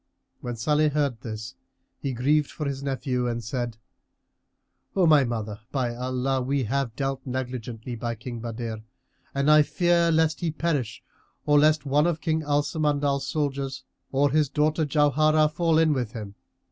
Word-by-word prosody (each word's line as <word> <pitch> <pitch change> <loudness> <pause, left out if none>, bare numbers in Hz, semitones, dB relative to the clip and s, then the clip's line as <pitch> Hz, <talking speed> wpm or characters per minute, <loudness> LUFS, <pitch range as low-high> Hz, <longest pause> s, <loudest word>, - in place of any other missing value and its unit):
When 120 -1 -5
Salih 150 +6 +2
heard 145 -6 -1
this, 110 +2 -6 0.5
he 140 - -2
grieved 140 +4 +2
for 150 - -5
his 140 -1 -3
nephew 130 -2 -1
and 120 -1 -3
said, 120 0 -3 1.2
"O 190 -2 +4
my 150 -3 +6
mother, 110 -4 -3
by 125 -4 -1
Allah, 130 +1 -1
we 135 +1 0
have 125 0 -1
dealt 135 -1 -2
negligently 125 -2 -5
by 115 0 -3
King 120 +1 -7
Badr 115 -1 -5 0.6
and 140 +2 +3
I 150 0 +8
fear 170 +2 +2
lest 160 -1 +2
he 170 - -1
perish 150 -7 -2 0.4
or 150 -1 +5
lest 155 0 +3
one 145 +4 +3
of 165 -2 -1
King 160 0 0
Al 145 -1 +1
Samandal's 145 -3 0
soldiers 140 -3 -2 0.3
or 140 +1 +2
his 150 -1 +2
daughter 155 +2 +1
Jauharah 155 +1 +3
fall 160 +1 +1
in 160 -1 +4
with 125 -4 -2
him. 105 -4 -7
140 Hz, 160 wpm, -26 LUFS, 125-150 Hz, 1.2 s, I